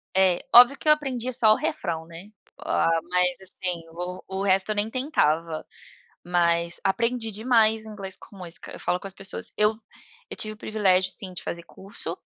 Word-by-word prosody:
É, 190 -2 +3
óbvio 250 +3 +9
que - - -9
eu 305 - +9
aprendi 255 -5 -3
só 225 -3 +4
o - - +1
refrão, 165 -6 -3
né, 170 +4 -12 0.3
ah, - - +1 0.2
mas 180 0 +2
assim, 180 -2 -4
o 180 +2 -6 0.2
o - - -1
resto 195 0 +2
eu - - -1
nem 205 +1 0
tentava. 165 - 0 0.6
Mas 170 -1 +1
aprendi 230 +3 0
demais 220 0 +2
inglês 200 -3 -6
com 200 - -15
música, 175 -3 -8
eu - - -9
falo 180 - 0
com 195 - -7
as 195 - -11
pessoas, 195 0 -4
eu 210 +1 +3 0.5
eu - - -6
tive 215 0 -2
o - - -16
privilégio, 190 -4 +2
sim, 185 -2 -4
de 180 - -7
fazer 170 0 -5
curso. 195 +4 -7
195 Hz, 185 wpm, -25 LUFS, 180-220 Hz, 0.6 s, óbvio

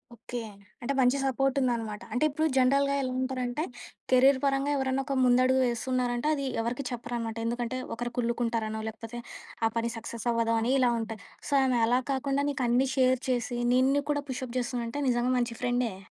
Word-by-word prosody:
Okay. 240 +1 -6 0.4
అంటే 275 +4 -1
మంచి 255 +2 +4
support 270 0 +1
ఉందనమాట. 230 -4 -1
అంటే 250 +6 +1
ఇప్పుడు 310 +3 0
జనరల్‌గా 275 +2 +3
ఎలా 255 - -2
ఉంటారంటే 255 +2 -2 0.5
కెరీర్ 260 +1 +6
పరంగా 275 +1 +1
ఎవరన్నా 265 0 0
ఒక 275 -1 -2
ముందడుగు 255 +1 +4
వేస్తున్నారంటే 245 +2 -1
అది 275 -1 -3 0.2
ఎవరికీ 240 +4 -2
చెప్పరనమాట. 235 -2 -4
ఎందుకంటే 240 +1 -2 0.2
ఒకరు 240 +1 -4
కుల్లుకుంటారనో 230 -2 -1
లేకపోతే 225 +2 -7 0.5
ఆ - - -1
పని 230 0 0
సక్సెస్ 230 0 -6
అవ్వదు 230 0 +1
అని 235 +3 0
ఇలా 245 -1 +4
ఉంటాయి. 225 -1 -5 0.3
సో 285 - -2
ఆమె 255 -3 +2
అలా 250 +2 +3
కాకుండా 275 +1 0
నీకు 270 - -2
అన్నీ 250 +3 +3
షేర్ 255 -1 +3
చేసి 245 -1 -1 0.2
నిన్ను 270 +3 +3
కూడా 290 -1 -1
పుష్ 260 0 -3
అప్ 240 - -10
చేస్తుందంటే 240 +2 -3
నిజంగా 245 +1 +1
మంచి 240 -1 -1
ఫ్రెండే. 245 -5 0
250 Hz, 170 wpm, -28 LUFS, 235-265 Hz, 0.5 s, కెరీర్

